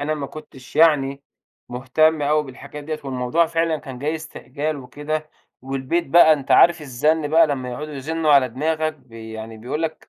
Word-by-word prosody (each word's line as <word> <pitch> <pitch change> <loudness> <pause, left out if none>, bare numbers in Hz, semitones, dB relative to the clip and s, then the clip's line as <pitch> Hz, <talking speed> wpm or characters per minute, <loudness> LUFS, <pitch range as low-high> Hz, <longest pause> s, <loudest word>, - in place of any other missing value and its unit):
أنا 155 +2 -1
ما 140 -2 -5
كنتش 145 -4 -12
يعني 140 -4 +3 0.5
مهتم 145 +5 +1
أوي 150 +1 +2
بالحاجات 140 +2 -10
ديّة، 155 0 -4
والموضوع 135 +5 0
فعلًا 165 -1 0
كان 130 -3 -9
جاي 150 +4 -2
استعجال 155 -1 -5
وكده، 150 +4 -5 0.3
والبيت 135 +6 -2
بقى 160 +2 +7
أنت 140 -3 -3
عارف 170 -1 +6
الزن 150 +3 0
بقى 160 +1 +5
لمّا 130 -4 -3
يقعدوا 150 +4 -6
يزنوا 155 +3 0
على 135 -3 +5
دماغك 155 +5 -1
بي 115 -5 -12
يعني 110 0 -8
بيقول 125 +8 -4
لك 160 -1 -5
150 Hz, 175 wpm, -21 LUFS, 130-155 Hz, 0.5 s, بقى